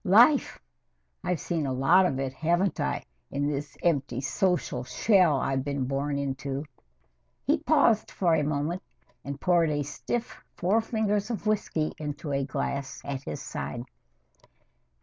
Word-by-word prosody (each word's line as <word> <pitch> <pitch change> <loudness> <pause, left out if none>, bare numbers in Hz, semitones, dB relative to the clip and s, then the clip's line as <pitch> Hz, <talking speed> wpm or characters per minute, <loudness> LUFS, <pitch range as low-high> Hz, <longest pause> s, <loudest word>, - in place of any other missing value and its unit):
Life! 240 +9 +5 0.6
I've 180 -3 0
seen 160 -2 -1
a 130 - -1
lot 170 +9 +5
of 135 -5 -2
it 135 -1 -2
haven't 175 +6 +1
I, - - -1 0.3
in 140 +1 -1
this 145 0 -3
empty 140 -7 +1
social 175 - 0
shell 165 - +4
I've 135 0 0
been 140 -2 -1
born 140 +2 -1
into!" 140 +1 -3 0.8
He 300 +2 +3
paused 280 -8 +3
for 175 -3 +1
a 155 -2 +3
moment 150 +5 -1 0.4
and 140 0 -5
poured 175 -2 +3
a 145 -1 0
stiff 225 - -4
four 200 +6 +3
fingers 215 -2 0
of 225 -2 -4
whisky 195 -7 0
into 150 0 -4
a 140 0 +1
glass 135 0 -3
at 140 -2 -3
his 75 - -5
side. 70 +12 -4
150 Hz, 150 wpm, -28 LUFS, 140-185 Hz, 0.8 s, Life